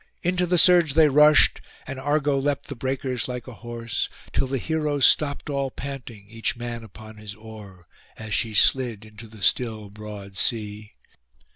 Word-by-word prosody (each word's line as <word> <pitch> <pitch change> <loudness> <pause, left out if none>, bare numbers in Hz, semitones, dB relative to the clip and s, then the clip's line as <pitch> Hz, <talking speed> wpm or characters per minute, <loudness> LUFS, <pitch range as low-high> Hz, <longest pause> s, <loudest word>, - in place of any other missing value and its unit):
Into 180 0 0
the 180 +1 +2
surge 170 -4 +6
they 155 -2 +6
rushed, 150 +2 +5 0.2
and 135 0 -6
Argo 145 +1 0
leapt 140 0 -2
the 140 - -5
breakers 130 0 -3
like 125 0 -6
a 125 - -8
horse, 115 0 -4 0.2
till 135 +3 0
the 135 +1 -2
heroes 150 -1 +1
stopped 140 -2 +3
all 140 -2 -2
panting, 125 -7 -8
each 115 +2 -3
man 120 -1 -6
upon 110 0 -13
his 105 -1 -9
oar, 105 -5 -13 0.3
as 110 -1 -6
she 110 -3 -1
slid 115 -3 +3
into 110 +1 -13
the 110 -2 -12
still 110 -3 0
broad 105 -2 -10
sea. 105 -1 -2
120 Hz, 165 wpm, -24 LUFS, 110-140 Hz, 0.3 s, surge